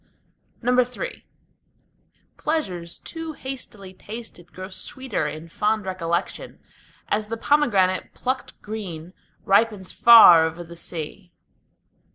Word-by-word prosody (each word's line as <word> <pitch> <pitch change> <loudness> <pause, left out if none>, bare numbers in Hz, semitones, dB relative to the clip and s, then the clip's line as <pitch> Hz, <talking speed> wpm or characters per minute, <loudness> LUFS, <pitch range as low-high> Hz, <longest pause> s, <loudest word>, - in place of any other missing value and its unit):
III 250 - 0 1.1
Pleasures 185 - -2
too 325 -1 -7
hastily 230 -9 -8
tasted 210 -3 -10
grow 185 +1 -8
sweeter 240 - -3
in 155 +2 -7
fond 210 +4 0
recollection, 175 -1 -3 0.5
As 210 0 -1
the 230 +1 -4
pomegranate 205 -10 +2
plucked 260 +1 -3
green 185 -6 -6 0.3
ripens 200 -1 +2
far 220 -9 +9
over 165 +2 -7
the 170 0 -12
sea. 170 +2 -7
205 Hz, 100 wpm, -23 LUFS, 175-240 Hz, 1.1 s, far